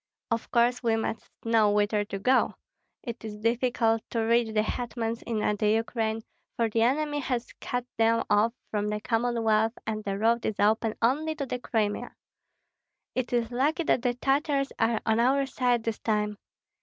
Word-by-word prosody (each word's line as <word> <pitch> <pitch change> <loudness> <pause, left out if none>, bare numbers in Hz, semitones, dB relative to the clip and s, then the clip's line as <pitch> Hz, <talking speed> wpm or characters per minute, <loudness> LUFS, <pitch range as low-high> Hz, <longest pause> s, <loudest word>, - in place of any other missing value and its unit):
"Of 230 0 -1
course 240 +1 +2
we 230 -2 +2
must 225 0 -3 0.2
know 225 -2 +4
whither 205 0 +2
to 200 - -5
go. 255 +7 +2 0.5
It 235 -2 -6
is 215 -1 -6
difficult 230 0 +1
to 230 - -1
reach 230 +1 +3
the 215 0 +2
hetmans 230 0 -3
in 230 - -1 0.2
the 210 +1 +2
Ukraine, 225 0 0 0.4
for 230 -2 +2
the 225 - +1
enemy 290 +5 +1
has 250 -3 -3
cut 245 0 -2
them 230 0 +3
off 210 +3 +3 0.2
from 210 -1 -1
the 210 0 -1
Commonwealth 225 -1 +1
and 215 -1 -3
the 195 -1 -2
road 230 +2 +2
is 215 - -2
open 220 +1 +2
only 305 +7 +2
to 285 -3 -3
the 250 -1 -4
Crimea. 215 -4 -2 1.0
It 255 -2 -2
is 240 -1 0
lucky 290 +7 +1
that 260 - +2
the 245 -1 0
Tartars 275 +2 +1
are 225 -1 +2
on 220 0 +2
our 270 +3 +3
side 245 -3 0
this 225 -2 -2
time. 210 -1 -1
230 Hz, 175 wpm, -27 LUFS, 220-245 Hz, 1.0 s, know